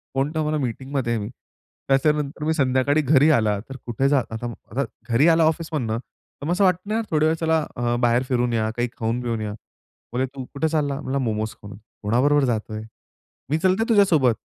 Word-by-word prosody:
Phone 135 +2 +1
ठेव 155 -1 0
मला 155 0 0
मीटिंगमध्ये 130 0 -2
आहे 110 - -2
मी." 105 - -5 0.6
त्याच्यानंतर 150 +1 +1
मी 160 - +2
संध्याकाळी 140 0 +2
घरी 145 +1 +4
आला 110 -7 +2
तर 135 - -7
कुठे 120 +3 0
जाल 140 -3 +3
आता 110 +2 -4 0.3
आता 135 +5 0 0.3
घरी 120 +7 +4
आला 165 0 +4
ऑफिसमधून, 155 -8 -1
तर 130 +3 -13
मग 165 - -1
असं 185 +3 +2
वाटतं 185 +1 +1
ना 225 - +1
थोडा 155 0 +3
वेळ 160 +1 +3
चला 160 0 +1 0.2
अ, 120 0 0
बाहेर 120 +1 +3
फिरून 125 -2 +1
या, 110 -1 +1
काही 120 +1 +1
खाऊन-पिऊन 115 0 -2
या. 105 -1 -3 0.6
बोलली, 130 +2 +1
"तू 130 - -5
कुठे 150 +3 0
चालला?" 145 -3 0
म्हणलं, 135 +1 -2
"मोमोज 110 -4 -1
खाऊन." 100 -1 -10 0.3
"कोणाबरोबर 135 +7 +3
जात 110 -3 -2
आहे? 110 0 -5 0.7
मी 155 - +2
चलते 190 +6 +2
तुझ्यासोबत. 165 - +4
135 Hz, 195 wpm, -23 LUFS, 120-155 Hz, 0.7 s, घरी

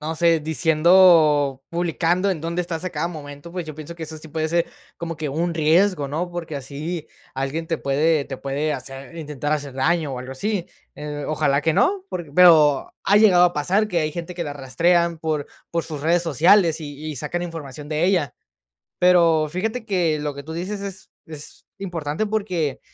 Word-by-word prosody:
no 155 +2 -3
sé, 165 -1 +3
diciendo 155 -3 +4
publicando 175 +2 0
en 165 -5 -2
dónde 170 +2 -2
estás 170 0 -5
a 185 - -2
cada 160 +2 -2
momento, 145 0 -9
pues, 180 -2 -4
yo 155 - -7
pienso 155 +2 -8
que 165 - -9
eso 155 0 -8
sí 160 - -12
puede 160 +1 -2
ser 170 +1 +1 0.3
como 165 -1 -5
que 155 -2 -3
un 165 +4 -1
riesgo, 160 -1 +2
¿no? 170 +5 -3
Porque 165 -4 -5
así 150 +5 -5 0.3
alguien 135 +5 -3
te 165 - -1
puede 145 +2 +1
te 135 - -6
puede 145 +3 -2
hacer, 135 +3 -8
intentar 150 -2 -3
hacer 145 -3 -2
daño, 155 +1 +1
o - - -5
algo 130 +1 -7
así. 200 +5 -2 0.3
Eh, 150 0 -5
ojalá 150 -2 +1
que 160 +1 +1
no, 380 - +2
porque 165 -5 -6
pero, 155 -6 +6
ha 205 - +4
llegado 185 -5 +6
a 175 - +3
pasar 190 +9 +1
que 175 -4 0
hay 155 -1 -1
gente 170 +1 -6
que 170 -1 -3
la 145 - -4
rastrean 170 +5 +1
por 155 -3 -2 0.2
por 170 -1 -1
sus 155 -3 -5
redes 170 +3 +2
sociales, 165 +1 +4
y 145 -2 -7
y 145 - -7
sacan 175 +6 -3
información 150 -4 -7
de 155 +2 0
ella. 175 -9 +1 0.6
Pero, 170 -4 +4
fíjate 220 +7 -3
que 170 -6 +1
lo 145 -1 -3
que 140 - -8
tú 160 - -8
dices 190 +5 -4
es 190 -1 -8 0.2
es 155 -2 -9 0.2
importante, 175 0 -3
porque, 185 -9 -2
160 Hz, 195 wpm, -22 LUFS, 150-175 Hz, 0.6 s, pero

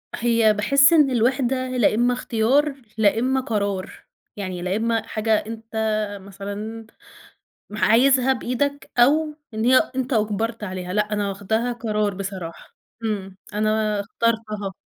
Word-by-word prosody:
هي 230 -2 +3
باحس 275 +9 +4
إن 300 -4 +5
الوحدة 255 +2 +1
لإمّا 245 0 +2
اختيار 260 +5 +1 0.2
لإمّا 225 +5 +2
قرار، 200 -5 -2 0.4
يعني 185 -3 -5
لإمّا 220 +5 0
حاجة 220 0 0
أنت 225 0 -7 0.6
مثلًا 205 +3 -7 0.8
م 210 - -7
عايزها 260 +4 +4
بإيدك 280 +3 -2
أو 300 +5 +4 0.2
إن 220 +1 -2
هي 255 +1 +6 0.2
أنت 260 0 -1
أُجبرت 220 +1 -1
عليها، 185 -2 -5
لأ، 210 +1 0
أنا 205 -1 -1
واخدها 220 +5 -1
قرار 215 -3 -1
بصراحة، 185 -3 -7 0.3
امم، 195 -4 -3 0.2
أنا 215 0 +1
اخترتها. 215 -2 -2
220 Hz, 120 wpm, -22 LUFS, 205-245 Hz, 0.8 s, هي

